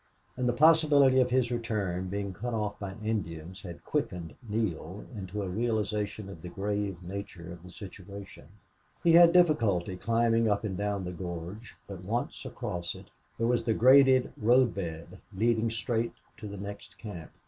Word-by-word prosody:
And 125 -1 0
the - - +2
possibility 145 -2 +6
of 125 - +2
his 125 -1 +2
return 105 -6 -2
being 100 0 -3
cut 120 +5 -4
off 105 -2 -2
by 95 -2 -5
Indians 90 -5 -3
had 85 -3 -9
quickened 85 -3 -2 0.2
Neale 105 -3 -2
into 100 0 -4
a - - -3
realization 105 0 -1
of 95 -5 -10
the 90 - -7
grave 100 -1 -3
nature 90 -2 -7
of 85 - -12
the 90 - -12
situation. 100 +1 -10 0.6
He 170 - +5
had 170 0 +8
difficulty 115 - +3
climbing 115 +2 +2
down 105 0 +1
and 95 -3 -3
up 100 -1 -1
the 90 - -4
gorge, 90 +4 -7
but, 100 -2 -8
once 115 +6 -3
across 85 -1 -4
it, - - -13 0.3
there 115 - 0
was 120 0 +2
the 110 - +2
graded 130 0 +6
road 120 +2 +4
bed, 85 -1 -6 0.2
leading 115 +1 +2
straight 115 +1 -1 0.2
to 110 - -7
the 100 0 -7
next 100 +1 -8
camp. 100 -8 -8
105 Hz, 170 wpm, -29 LUFS, 95-115 Hz, 0.6 s, had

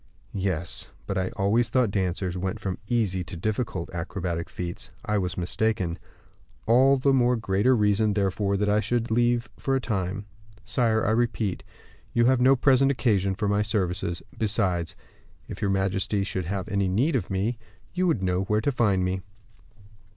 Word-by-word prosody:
"Yes; 90 -4 -2 0.2
but 95 - -3
I 95 -1 0
always 110 +3 +2
thought 125 -5 +2
dancers 95 -2 -1
went 95 +1 -3
from 95 -2 -4
easy 100 -6 0
to 85 0 -7
difficult 110 -2 -2
acrobatic 85 -1 -3
feats. 85 -1 -5 0.2
I 105 -1 +1
was 90 -2 -3
mistaken; 90 -1 -1 0.7
all 130 +4 +5
the 135 +1 +2
more 125 -1 +3
greater 110 +3 +2
reason, 105 -1 +2
therefore, 100 0 0
that 105 +1 0
I 105 +1 +3
should 120 +1 -1
leave 120 0 +2
for 135 - 0
a - - +2
time. 100 -4 -2 0.4
Sire, 110 +1 +1
I 110 - +2
repeat, 115 -4 0 0.5
you 120 0 +3
have 130 0 +3
no 130 +2 +6
present 135 +1 +4
occasion 100 -8 +1
for 105 0 -1
my 105 +1 +2
services; 90 -5 -1
besides, 95 -6 0 0.5
if - - -8
your 100 - +1
majesty 95 +1 0
should 95 -3 -3
have 95 +1 -3
any 100 -2 0
need 120 - +1
of - - -1
me, 105 +5 -1 0.3
you 185 0 +1
would 120 - +1
know 90 0 +1
where 105 +1 +1
to 145 - +1
find 100 -7 +2
me." 95 +1 -1
100 Hz, 170 wpm, -26 LUFS, 95-120 Hz, 0.7 s, no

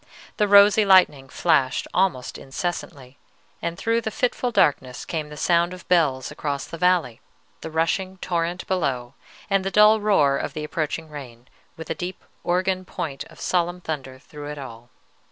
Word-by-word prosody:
The 210 - +2
rosy 205 +1 +7
lightning 180 -9 +4
flashed 140 -4 +1
almost 180 -10 0
incessantly, 140 -3 -5 0.4
and 170 0 -3
through 230 +3 0
the 220 - -3
fitful 250 +2 -1
darkness 135 - +1
came 155 -3 -4
the 150 - -10
sound 170 +2 +2
of 185 - -15
bells 145 -8 +2
across 145 -2 -3
the 165 - -9
valley, 175 -10 +2 0.4
the 160 - -6
rushing 185 +4 -1
torrent 175 0 -2
below, 135 -9 -1 0.3
and 195 -1 +1
the 195 - -1
dull 210 +2 +6
roar 150 -10 +3
of - - -4
the 155 - -5
approaching 155 +1 -3
rain, 125 -5 -10 0.3
with 160 0 -7
a - - +2
deep 175 +3 -6 0.2
organ 185 +1 0
point 140 -6 -5
of - - -17
solemn 175 0 0
thunder 135 -6 -5
through 145 +2 -10
it 150 - -6
all. 120 -3 -10
165 Hz, 165 wpm, -23 LUFS, 140-185 Hz, 0.4 s, rosy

